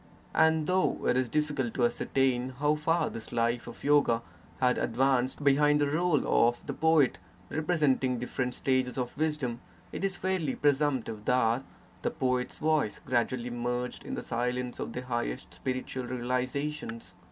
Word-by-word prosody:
And 160 -1 +4
though 185 +2 +1
it - - +3
is 130 -2 +1
difficult 145 -4 -1
to 120 - +3
ascertain 130 +1 0
how 150 +2 +2
far 155 +3 +1
this 115 - -8
life 120 +1 0
of - - -10
yoga 140 -6 +3 0.4
had 125 -1 +3
advanced 130 +3 +1
behind 145 +1 +4
the 145 -1 +1
role 165 -2 +2 0.2
of 120 0 -2
the - - -3
poet 160 -4 +3 0.3
represent 155 -4 +1
ing 125 -1 +1
different 125 +1 -3
stages 130 -1 0
of 125 -1 -3
wisdom, 150 -6 -1 0.3
it - - -5
is 195 -2 0
fairly 185 -7 -1
presumptive 135 -7 0
that 125 0 +2 0.4
the - - 0
poet's 125 -1 -1
voice 155 -8 +1
gradually 120 0 0
merged 120 +1 -3
in - - -5
the - - -5
silence 125 +1 -2
of - - -4
the 125 - -4
high 120 -2 -1
est - - -7
spiritual 130 0 -4
realizations. 125 +1 -3
130 Hz, 160 wpm, -29 LUFS, 125-150 Hz, 0.4 s, And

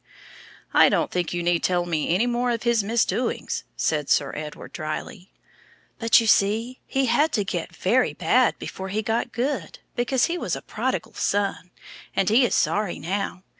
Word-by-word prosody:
"I - - +7
don't - - 0
think 175 -2 -1
you 175 0 -2
need 175 -1 +2
tell 175 -1 +1
me 160 -3 -1
any 185 +8 +2
more 245 0 0
of 230 -2 -1
his 235 -3 +2
misdoings," 235 +3 -1
said 150 -3 0
Sir 140 - +2
Edward, 150 0 -7
drily. 175 +4 -6 0.7
"But, 230 0 +5
you 230 - -1
see, 220 +4 +2
he 270 0 +1
had 285 +6 +2
to 210 - +1
get 195 - -4
very - - +1
bad - - +2
before 190 0 -6
he 215 +3 -2
got 225 +2 -1
good, 240 - -2 0.2
because 245 +1 +2
he 350 +1 -2
was - - -2
a - - -7
prodigal - - -3
son. 200 -3 -1 0.5
And 190 - +2
he 235 +5 +5
is - - 0
sorry 210 -3 +1
now. 190 +1 -3
205 Hz, 175 wpm, -24 LUFS, 175-240 Hz, 0.7 s, I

